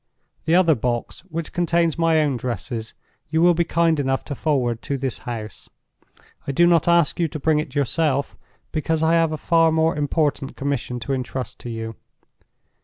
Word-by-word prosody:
"The 160 +2 +3
other 175 -3 +5
box, 120 -2 -2
which 165 -3 -5
contains 170 -2 +1
my 165 -2 +3
own 145 -3 0
dresses, 120 -2 -4 0.3
you 160 +1 +1
will 175 +1 +6
be 170 +1 +2
kind 165 -2 +1
enough 135 -1 -1
to 145 - -4
forward 125 -6 0
to 140 - -3
this 130 -2 -3
house. 110 -2 -7 0.8
I - - 0
do 170 +6 +4
not 170 -2 +3
ask 170 -1 +3
you 170 - +2
to 155 - -6
bring 155 +1 +2
it 150 -2 -5
yourself, 140 0 0 0.4
because 160 0 -1
I 160 +1 +3
have 165 -1 +3
a 155 - -2
far 165 +2 +3
more 160 0 +2
important 145 -1 -1
commission 135 -3 -2
to 135 +4 -2
intrust 130 -1 -4
to 120 - -7
you. 115 -1 -5
150 Hz, 180 wpm, -22 LUFS, 130-165 Hz, 0.8 s, will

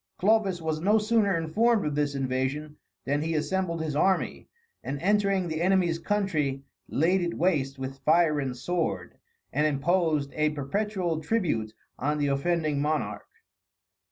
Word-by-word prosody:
Clovis 195 -4 +2
was 155 -1 -2
no 205 +5 +4
sooner 210 -4 +2
informed 210 +7 +2
of 150 - -1
this 145 -1 0
invasion, 135 +3 -2 0.3
than 145 +2 0
he 165 +1 -1
assembled 170 +1 -1
his 150 -2 -3
army, 190 +5 +1 0.4
and 140 +1 -4
entering 195 0 +2
the 160 0 -3
enemy's 180 -2 +2
country, 160 -9 -1 0.3
laid 180 +6 +2
it 170 -1 -2
waste 145 -6 0
with 135 0 -6
fire 155 +1 +3
and 130 -3 -3
sword, 125 - -3 0.3
and 150 +3 +2
imposed 155 -1 +1
a 155 0 +2
perpetual 175 +3 -2
tribute 150 - -1 0.2
on 150 +3 0
the 145 - 0
offending 155 0 0
monarch. 150 +1 -2
160 Hz, 145 wpm, -27 LUFS, 145-185 Hz, 0.4 s, no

